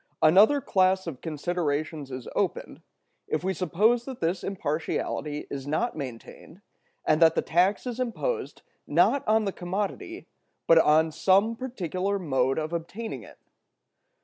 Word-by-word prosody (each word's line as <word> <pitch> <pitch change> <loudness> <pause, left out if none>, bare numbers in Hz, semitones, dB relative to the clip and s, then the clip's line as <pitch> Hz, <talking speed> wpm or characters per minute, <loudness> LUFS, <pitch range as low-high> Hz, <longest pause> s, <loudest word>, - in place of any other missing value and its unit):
Another 205 - +6
class 190 -3 +2
of 155 -7 -7
considerations 155 -2 -2
is 130 -2 -7
opened, - - -2 0.5
if 155 - -2
we 190 +1 0
suppose 210 +7 +2
that 260 -2 -7
this 170 +3 -1
impartiality 155 -3 -3
is 140 -1 -5
not 195 +12 -1
maintained, 140 - -9 0.4
and 155 +2 +2
that 165 -1 +6
the - - +1
tax 180 +7 +2
is 245 -1 -4
imposed, 255 - -3 0.2
not 280 - +3
on 215 0 +3
the 195 - -2
commodity, 200 - -4 0.4
but 165 -1 +6
on 160 +1 +4
some 195 +8 +3
particular 200 -6 -3
mode 135 -7 0
of 155 +1 -3
obtaining 190 +7 -5
it. - - -14
175 Hz, 140 wpm, -27 LUFS, 155-210 Hz, 0.5 s, Another